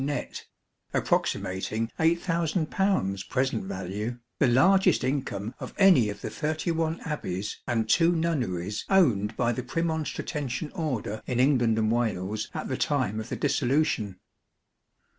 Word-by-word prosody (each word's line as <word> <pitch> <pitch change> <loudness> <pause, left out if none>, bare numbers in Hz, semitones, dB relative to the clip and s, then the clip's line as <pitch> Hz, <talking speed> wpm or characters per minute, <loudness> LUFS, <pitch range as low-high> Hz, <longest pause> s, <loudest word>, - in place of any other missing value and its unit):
net, 145 -2 -4 0.5
(approximating 100 +4 0
8,000 165 0 +1 0.6
present 135 +8 0
value), 110 - -4 0.2
the 140 - +4
largest 190 +11 +4
income 125 -5 -2
of - - -7
any 180 - +6
of 100 - -6
the - - -4
thirty 155 +7 -1
one 165 0 -1
Abbeys 105 - -4
and 115 -2 0
two 165 +8 +4
Nunneries 120 - -1
owned 115 - +3
by 120 -1 +2
the 120 - -2
Premonstratensian 150 -1 -3
Order 125 - -3
in 125 -1 -1
England 125 -4 +3
and 110 0 +2
Wales 110 -3 -1
at - - -3
the - - -2
time 105 +3 0
of 110 +2 -6
the - - -2
Dissolution. 135 -8 0
125 Hz, 130 wpm, -27 LUFS, 110-160 Hz, 0.6 s, any